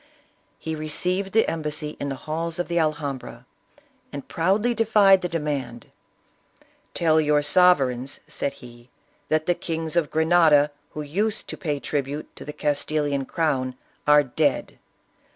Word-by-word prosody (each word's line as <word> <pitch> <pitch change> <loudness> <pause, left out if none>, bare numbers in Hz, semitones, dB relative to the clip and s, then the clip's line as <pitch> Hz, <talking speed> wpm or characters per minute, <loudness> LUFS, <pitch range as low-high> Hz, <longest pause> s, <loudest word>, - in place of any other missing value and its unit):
He 160 - -5
received 180 +5 -2
the 225 +2 +3
embassy 150 -1 -4
in 140 - -3
the 135 - -3
halls 160 +5 -4
of 175 - -2
the 170 0 0
Alhambra, 150 -4 -3 0.7
and 140 -1 -7
proudly 200 +8 +1
defied 210 -4 +5
the 180 - -2
demand. 145 -8 -4 0.5
" - - -35
Tell 160 -2 +3
your 150 -1 +2
sovereigns," 140 -7 +3
said 140 - -3
he, 120 -2 -15 0.2
" - - -40
that 155 0 +1
the 175 - +3
kings 165 -1 -4
of 170 -4 +2
Grenada 160 -2 +4 0.2
who 150 - -4
used 205 +9 -1
to - - -5
pay 150 -5 -3
tribute 145 +1 -4
to - - -10
the 150 - -6
Castilian 145 -1 -1
crown 135 -7 -1 0.3
are 150 0 +6
dead. 140 +1 -1
155 Hz, 150 wpm, -24 LUFS, 145-170 Hz, 0.7 s, are